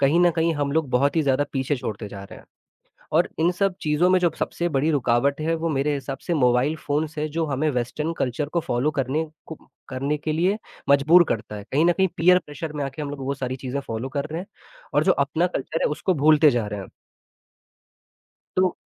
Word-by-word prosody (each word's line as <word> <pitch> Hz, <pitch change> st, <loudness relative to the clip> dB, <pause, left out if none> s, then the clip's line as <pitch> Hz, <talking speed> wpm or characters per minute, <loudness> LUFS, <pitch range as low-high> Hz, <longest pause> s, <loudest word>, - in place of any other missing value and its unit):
कहीं 145 Hz, +5 st, +4 dB
न 175 Hz, -1 st, +5 dB
कहीं 165 Hz, 0 st, +2 dB
हम 145 Hz, -1 st, -1 dB
लोग 160 Hz, -3 st, +1 dB
बहुत 140 Hz, +5 st, +2 dB
ही 160 Hz, -, +4 dB
ज़्यादा 140 Hz, 0 st, +2 dB
पीछे 135 Hz, +1 st, 0 dB
छोड़ते 105 Hz, -3 st, -5 dB
जा 100 Hz, -1 st, -9 dB
रहे -, -, -12 dB
हैं -, -, -17 dB, 0.7 s
और -, -, +3 dB
इन 170 Hz, -, +4 dB
सब 195 Hz, 0 st, 0 dB
चीज़ों 155 Hz, +4 st, +2 dB
में 185 Hz, -, +5 dB
जो 175 Hz, -2 st, +3 dB
सबसे 175 Hz, -, -1 dB
बड़ी 150 Hz, 0 st, +1 dB
रुकावट 140 Hz, +1 st, +1 dB
है 165 Hz, +2 st, 0 dB
वो 165 Hz, +1 st, -2 dB
मेरे 145 Hz, -1 st, 0 dB
हिसाब 135 Hz, -1 st, -5 dB
से 170 Hz, -, 0 dB
मोबाइल 125 Hz, +2 st, +2 dB
फ़ोन 150 Hz, +1 st, -1 dB
से 155 Hz, 0 st, -3 dB
जो 165 Hz, +2 st, -1 dB
हमें 145 Hz, +2 st, 0 dB
वेस्टर्न 135 Hz, +6 st, -2 dB
कल्चर 135 Hz, +4 st, -1 dB
को 170 Hz, +2 st, 0 dB
फॉलो 125 Hz, +5 st, +1 dB
करने 135 Hz, +5 st, 0 dB, 0.2 s
को 160 Hz, -, -7 dB, 0.3 s
करने 140 Hz, +3 st, -1 dB
के 155 Hz, +1 st, -2 dB
लिए 185 Hz, +7 st, +1 dB, 0.3 s
मजबूर 155 Hz, +6 st, +6 dB
करता 105 Hz, -1 st, -3 dB
है, 100 Hz, -, -8 dB
कहीं 150 Hz, +4 st, +3 dB
न 175 Hz, -, +5 dB
कहीं 190 Hz, +1 st, +2 dB
पीयर 180 Hz, +3 st, +5 dB
प्रेशर 150 Hz, +2 st, -6 dB
में 145 Hz, -2 st, -3 dB
आके 135 Hz, +3 st, -5 dB
हम 145 Hz, -, -4 dB
लोग 145 Hz, -1 st, -7 dB
वो 140 Hz, -, -1 dB
सारी 130 Hz, -1 st, -4 dB
चीज़ें 135 Hz, +2 st, -4 dB
फॉलो 115 Hz, 0 st, -5 dB
कर 140 Hz, +2 st, -3 dB
रहे 165 Hz, -, -3 dB
हैं 190 Hz, -, -8 dB, 0.5 s
और -, -, +3 dB
जो 185 Hz, -, +5 dB
अपना 145 Hz, +5 st, +1 dB
कल्चर 165 Hz, -2 st, -3 dB
है -, -, +3 dB
उसको 185 Hz, +5 st, 0 dB
भूलते 155 Hz, 0 st, +5 dB
जा 120 Hz, -5 st, -1 dB
रहे 105 Hz, -1 st, -5 dB
हैं। -, -, -10 dB, 1.7 s
तो 185 Hz, -1 st, +2 dB
145 Hz, 225 wpm, -24 LUFS, 135-165 Hz, 1.7 s, मजबूर